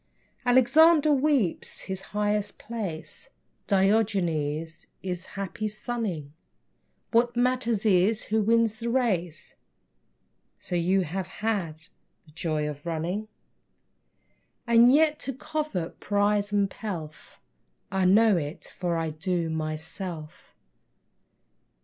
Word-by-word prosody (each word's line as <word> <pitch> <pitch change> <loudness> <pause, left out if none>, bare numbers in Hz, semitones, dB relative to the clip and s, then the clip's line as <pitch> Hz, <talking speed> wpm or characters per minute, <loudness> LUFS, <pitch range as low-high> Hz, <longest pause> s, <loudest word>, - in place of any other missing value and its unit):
Alexander 300 +5 +6
weeps 275 - 0
his 190 -1 -5
highest 210 0 -1
place, 200 -9 -6 0.4
Diogenes 175 -7 +1 0.2
is 180 -1 -4
happy 200 +2 -3
sunning! 210 - -4 0.8
What 240 +1 +2
matters 245 -3 +1
it 205 +2 +3
who 220 +1 0
wins 225 0 +2
the 235 0 -3
race 185 -10 -1 1.0
So 180 - -5
you 180 +3 +2
have 180 +2 -3
had 185 -7 -3 0.4
the 155 - -19
joy 155 -1 -2
of 150 +2 -7
running? 170 +6 -2 1.4
And 235 +1 +6
yet, 305 +1 +3
you 270 - -1
covet 300 - -4
prize 205 0 +1
and 200 -1 +2
pelf. 165 -8 -7 0.5
I 190 -1 +1
know 205 +1 +5
it, 150 0 -5
for 175 -2 -1
I 165 -1 -2
do, 170 +1 -2
myself. 160 +1 -6
195 Hz, 105 wpm, -27 LUFS, 170-230 Hz, 1.4 s, Alexander